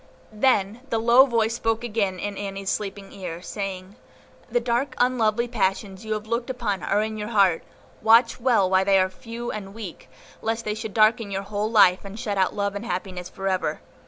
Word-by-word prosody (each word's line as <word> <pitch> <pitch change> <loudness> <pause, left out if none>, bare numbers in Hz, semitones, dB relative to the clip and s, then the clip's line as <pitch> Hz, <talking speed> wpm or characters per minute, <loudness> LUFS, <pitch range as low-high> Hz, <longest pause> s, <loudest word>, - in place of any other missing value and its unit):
Then 215 -1 +1
the 225 - 0
low 235 +4 +6
voice 230 -2 +1
spoke 225 0 -1
again 210 -5 -1
in 205 +3 -4
Annie's 195 -1 -4
sleeping 200 -1 -4
ear, 175 -4 -6
saying, 195 0 -6 0.5
"The 485 - +2
dark, 255 - -1
unlovely 235 -2 +2
passions 195 -3 -1
you 220 0 -2
have 215 0 -4
looked 235 +2 -2
upon 220 -7 -2
are 205 +3 +1
in 220 0 -4
your 210 0 -4
heart; 195 -7 +3 0.4
watch 230 +2 +5
well 230 -6 +3
while 190 0 +3
they 195 0 +4
are 185 0 +2
few 230 +4 -7
and 200 -1 -7
weak, 205 -7 -9 0.3
lest 225 +1 -2
they 210 - -1
should 220 -1 -6
darken 215 0 +4
your 195 0 -3
whole 205 +1 -2
life, 190 -5 +5
and 200 +2 -8
shut 210 -5 -2
out 185 - +1
love 200 -1 -1
and 205 +1 -5
happiness 180 0 -4
for 195 0 -5
ever. 185 -1 -1
210 Hz, 195 wpm, -24 LUFS, 195-230 Hz, 0.5 s, low